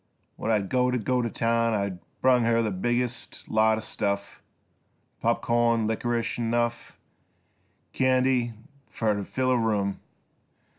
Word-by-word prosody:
When - - -4
I'd 105 -3 +1
go 125 +1 +2
t' 125 - +1 0.3
town 115 0 +1
I 100 -3 -2 0.2
brung 125 -1 +5
Her 115 0 +2
the 110 - -1
biggest 120 +5 -2
lot 110 0 +3
o' - - -4
stuff, 100 -2 -3 0.8
Pop - - +1
corn, 115 -1 +2
likrish, 115 +2 -1
'n' 120 - -1
enough 120 +1 -1 1.0
Candy 130 -2 +2 0.4
fer 110 -2 0
t' 100 0 -3
fill 130 +5 -1
a 125 - +3
room. 105 -3 0
115 Hz, 135 wpm, -26 LUFS, 110-120 Hz, 1.0 s, brung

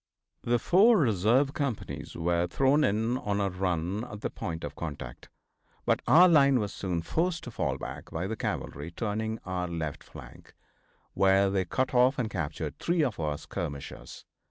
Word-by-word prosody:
The 120 0 +2
four 205 - +5
reserve 125 - +3
companies 140 -9 -4
were 85 +1 0
thrown 135 - +3
in 110 +4 +1
on 100 0 -1
a 100 -1 0
run 90 +2 -1
at 105 -4 -9
the - - -3
point 85 -7 -5
of 75 -1 -5
contact, 70 -6 -7 0.6
but - - +2
our 165 +9 +8
line 140 -5 +5
was 105 -2 -3
soon 90 -4 -3
forced 165 - -1
to 125 - -7
fall - - -1
back - - -7
by 80 +3 -3
the 110 +3 -3
cavalry 75 -7 -4
turning 110 +4 -3
our 90 -1 -2
left 80 -4 -4
flank, - - -13 0.6
where 95 0 +4
they 95 -2 0
cut 130 +9 -1
off 125 +2 +4
and 115 -4 -2
captured 80 -7 -4
three 170 -2 +1
of 125 -10 -2
our 75 -2 -1
skirmishers. 70 -1 -7
105 Hz, 170 wpm, -29 LUFS, 85-130 Hz, 0.6 s, our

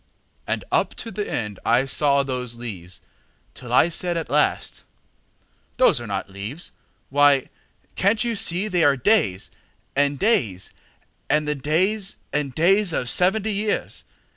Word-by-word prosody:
And - - -2
up - - +1
to 230 - -6
the 205 +1 -4
end 105 -4 -3
I 120 +3 +3
saw 140 +1 +2
those 125 -3 -4
leaves 95 -7 -7 0.5
Till 120 -2 -10
I 130 +7 +5
said 175 0 -1
at 165 - -4
last, 150 +1 0 0.9
"Those 120 - +4
are 120 - -7
not 100 -1 -3
leaves, 100 - -6 0.4
Why, 145 -1 +4 0.5
can't 205 +4 +2
you 235 -1 -1
see 200 -1 +1
they 180 -5 +1
are 140 -2 +4
days 120 - +1 0.4
and 140 0 +2
days 115 - 0 0.6
And 150 0 +2
the 150 - +1
days 185 +9 0 0.2
and 140 -3 -2
days 190 +2 +3
of 125 - -1
seventy 205 - +2
years? 205 +1 -2
145 Hz, 145 wpm, -23 LUFS, 125-190 Hz, 0.9 s, I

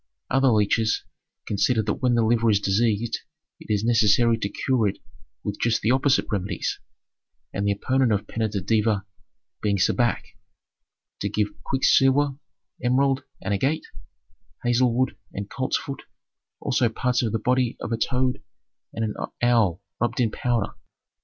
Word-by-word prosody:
Other 135 +1 +3
leeches 110 -1 +2 0.4
consider 110 +2 +1
that 105 0 -2
when 125 -2 +3
the 115 - +3
liver 115 0 +3
is 105 -2 +4
diseased 110 +3 +1 0.4
it - - -7
is 105 0 +1
necessary 115 0 +4
to 100 - -2
cure 120 -2 +1
it 100 - -2 0.5
with 105 -1 -4
just 115 -1 +1
the 110 - +3
opposite 135 +2 +3
remedies, 100 -3 -2 0.7
and 100 +1 -1
the - - +3
opponent 130 +4 +1
of 100 0 0
Peneter 110 -2 -2
Deva 105 -2 +1 0.6
being 100 -1 +1
Sebek, 120 +6 +1 1.0
to - - -1
give 105 -1 0
quicksilver, 135 +1 +3 0.5
emerald, 135 +2 +2 0.2
and 100 - -1
agate, 135 +10 0 0.8
hazel 120 +1 +3
wood 130 +2 0 0.2
and 100 0 -6
coltsfoot, 135 +1 -2 0.6
also 120 - +1
parts 125 +2 0
of 115 -3 -1
the 115 - +1
body 125 +2 +1
of - - -5
a 115 - 0
toad 125 +2 0 0.5
and 115 - -1
an 105 - -3 0.3
owl 115 -8 +3 0.2
rubbed 120 +1 -1
into 115 -3 +1
powder. 120 -3 +1
Planet - - -10
Mercury. - - -21
115 Hz, 155 wpm, -24 LUFS, 105-125 Hz, 1.0 s, is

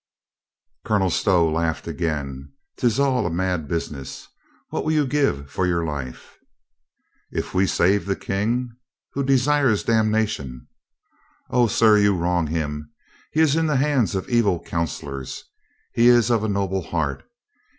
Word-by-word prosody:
Colonel 95 -4 +1
Stow 90 -2 +3
laughed 80 0 -1
again. 70 -4 -4
" - - -58
'Tis 120 0 +1
all 130 -7 +2
a - - -1
mad 90 -2 -1
bus 85 +2 -2
iness. 70 -3 -9 0.4
What - - -2
will 155 - 0
you 150 -2 +2
give 125 - 0
for 90 +6 0
your 85 -1 0
life?" 70 -5 -7 0.9
"If - - -4
we 95 +1 +2
save 100 +4 +2
the 100 - 0
King 115 +7 -2
— 125 - -67
" - - -69
"Who 140 - -2
desires 135 -3 +2
damnation." 110 - 0 0.9
"O, 120 -1 +4
sir, 110 -1 +4
you 100 -1 +3
wrong 85 -1 0
him. 75 -1 -3 0.4
He 155 - +2
is 155 -2 +4
in 165 0 +1
the 150 - +1
hands 135 - +1
of 95 - -3
evil 115 -8 +2
counselors. 70 -5 -4 0.5
He 120 +1 +4
is 120 -1 +5
of 115 -2 +2
a 110 - 0
noble 95 -1 -1
heart. 80 -5 -2
95 Hz, 160 wpm, -23 LUFS, 80-120 Hz, 0.9 s, is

